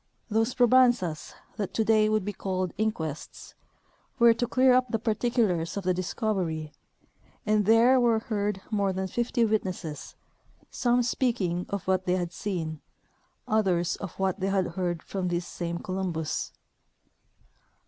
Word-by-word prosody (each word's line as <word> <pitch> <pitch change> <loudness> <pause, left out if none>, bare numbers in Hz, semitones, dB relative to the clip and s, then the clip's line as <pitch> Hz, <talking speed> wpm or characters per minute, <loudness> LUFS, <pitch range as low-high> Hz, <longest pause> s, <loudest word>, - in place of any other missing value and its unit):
Those 225 +3 +1
probanzas^ 245 -9 +3 0.2
that 200 -3 -4
today 220 -1 +3
would 215 -3 +1
be 205 - -3
called 185 -2 -3
inquests, 160 -9 -4 0.6
were 235 -1 +6
to 240 +1 -2
clear 255 +1 +4
up 255 0 +3
the 225 - 0
par 225 0 0
ticulars 210 -7 0
of 200 - -3
the 185 0 +2
discovery, 180 -5 -2 0.7
and 210 -1 +2
there 235 +4 +6
were 235 -2 +3
heard 210 -3 -2
more 200 -2 +1
than 190 +1 -2
fifty 240 +3 0
witnesses, 185 -8 -3 0.6
some 245 -1 +2
speaking 220 -8 -1
of 200 -2 -4
what 185 0 +1
they 180 - +3
had 175 -2 -3
seen, 165 -5 -4 0.7
others 185 -6 +1
of 195 -4 -8
what 190 0 0
they 190 - -1
had 195 -2 +1
heard 175 -1 -3
from 190 -2 -3
this 175 0 -1
same 170 -1 -4
Columbus. 180 -4 -3
195 Hz, 145 wpm, -27 LUFS, 180-225 Hz, 0.7 s, were